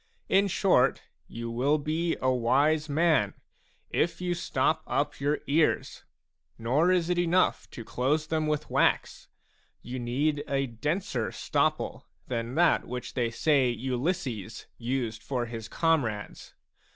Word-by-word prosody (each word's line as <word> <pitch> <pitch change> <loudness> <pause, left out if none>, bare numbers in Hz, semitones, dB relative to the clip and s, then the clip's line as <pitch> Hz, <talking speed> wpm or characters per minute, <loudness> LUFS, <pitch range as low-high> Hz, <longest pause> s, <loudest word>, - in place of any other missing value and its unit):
In 195 +1 +4
short, 180 -9 +2 0.2
you 115 0 -6
will 135 +6 +2
be 160 +3 -1
a 130 - +3
wise 145 +6 +2
man, 155 - +2 0.6
if 170 - 0
you 180 -1 -1
stop 175 - 0
up - - -1
your 145 +2 0
ears; 155 +3 +1 0.5
nor 140 +10 +2
is 180 -2 +2
it 175 - +1
enough 175 +1 +2
to 115 - -9
close 145 +7 0
them 155 0 -1
with 150 -1 -2
wax; - - +1 0.6
you 125 +1 -5
need 145 +5 0
a 135 0 0
denser 135 - -2
stopple - - -1 0.2
than 120 0 -3
that 175 0 +3
which 125 0 -6
they 120 -3 0
say 135 +1 +2
Ulysses 125 - -3
used 120 -3 -2
for 125 -3 -2
his 115 -1 -7
comrades. 125 -10 -1
140 Hz, 135 wpm, -28 LUFS, 120-160 Hz, 0.6 s, In